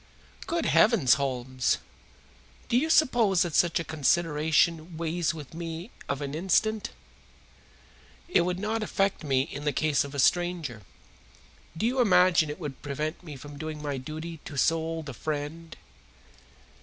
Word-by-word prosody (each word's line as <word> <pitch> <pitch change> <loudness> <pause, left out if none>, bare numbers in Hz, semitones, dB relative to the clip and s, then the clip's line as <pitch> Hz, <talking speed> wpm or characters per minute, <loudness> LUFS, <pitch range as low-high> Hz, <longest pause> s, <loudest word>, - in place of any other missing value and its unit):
"Good 335 -1 -1
heavens, 205 - +5
Holmes! 130 -1 0 0.9
Do - - +1
you 295 +6 +2
suppose 235 - +4
that 175 -3 -4
such 170 +1 +3
a - - -2
consideration 160 +2 +1
weighs 165 0 0
with 155 -4 -10
me 165 +4 -6 0.2
of 140 +1 -2
an 140 0 -4
instant? 200 +6 +1 1.4
It 345 - +3
would 180 +1 -1
not 215 +3 -2
affect 195 -3 0
me 135 -3 +2
in 145 -1 -7
the 150 - +1
case 150 -1 +1
of 140 0 -8
a - - -4
stranger. 175 -7 +1 1.0
Do 215 - 0
you 255 +2 +2
imagine 180 -7 +4
it 150 - -6
would 145 -6 -6
prevent 150 +3 -4
me 155 -4 -8
from 145 +2 -10
doing 155 -1 -5
my 145 -2 -3
duty 160 +4 -7
to 145 - -8
so 165 +4 +3
old 160 -1 -4
a 140 - -6
friend?" 155 +5 -5
160 Hz, 155 wpm, -27 LUFS, 145-180 Hz, 1.4 s, heavens